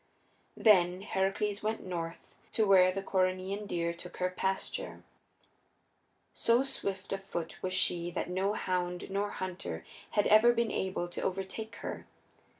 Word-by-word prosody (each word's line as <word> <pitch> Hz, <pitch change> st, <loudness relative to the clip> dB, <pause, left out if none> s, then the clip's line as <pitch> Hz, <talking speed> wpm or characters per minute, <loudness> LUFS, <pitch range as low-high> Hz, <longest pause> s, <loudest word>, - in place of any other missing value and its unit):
Then 185 Hz, -4 st, +5 dB
Heracles 200 Hz, +1 st, 0 dB
went 220 Hz, +1 st, -2 dB
north 170 Hz, -2 st, -5 dB, 0.2 s
to 220 Hz, -, +3 dB
where 185 Hz, -2 st, +6 dB
the 195 Hz, +1 st, -4 dB
Coryneian 190 Hz, +2 st, 0 dB
deer 170 Hz, -2 st, -1 dB
took 175 Hz, +1 st, -10 dB
her 180 Hz, 0 st, 0 dB
pasture. 190 Hz, +1 st, -2 dB, 1.3 s
So 235 Hz, +3 st, +3 dB
swift 195 Hz, -8 st, -3 dB
of 195 Hz, 0 st, -4 dB
foot 170 Hz, -4 st, -5 dB
was 185 Hz, 0 st, -1 dB
she 175 Hz, -2 st, +2 dB
that 175 Hz, -, -3 dB
no 190 Hz, +3 st, 0 dB
hound 180 Hz, -2 st, -2 dB
nor 200 Hz, +1 st, 0 dB
hunter 185 Hz, -2 st, -5 dB, 0.3 s
had 205 Hz, -, +5 dB
ever 220 Hz, +3 st, +7 dB
been 235 Hz, -2 st, +1 dB
able 190 Hz, -2 st, -1 dB
to -, -, -5 dB
overtake 195 Hz, +4 st, -3 dB
her. -, -, -5 dB
190 Hz, 145 wpm, -32 LUFS, 180-205 Hz, 1.3 s, ever